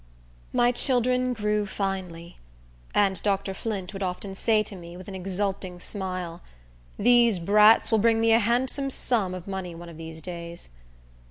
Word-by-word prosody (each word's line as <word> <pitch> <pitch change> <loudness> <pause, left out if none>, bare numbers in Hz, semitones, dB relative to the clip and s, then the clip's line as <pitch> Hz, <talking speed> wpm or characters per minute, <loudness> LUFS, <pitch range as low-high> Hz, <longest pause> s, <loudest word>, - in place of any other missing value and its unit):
My 240 0 +3
children 250 0 +2
grew 210 -2 0
finely; 185 -4 -4 0.6
and 195 -2 +2
Dr. 195 -1 0
Flint 195 -2 -4
would 195 - -6
often 190 +1 -3
say 215 +2 +2
to 205 - -8
me, 170 -1 -10
with 185 - -11
an 200 - -7
exulting 190 -1 -3
smile. 185 -3 -5 0.6
"These 235 -2 +5
brats 210 +7 +5
will 220 - +4
bring 225 +1 +3
me 225 0 +3
a 225 - +6
handsome 250 +5 0
sum 215 -8 0
of 185 0 -9
money 190 -3 -5
one 170 +1 -9
of 165 - -11
these 160 0 -8
days." 170 0 -8
195 Hz, 160 wpm, -26 LUFS, 180-225 Hz, 0.6 s, a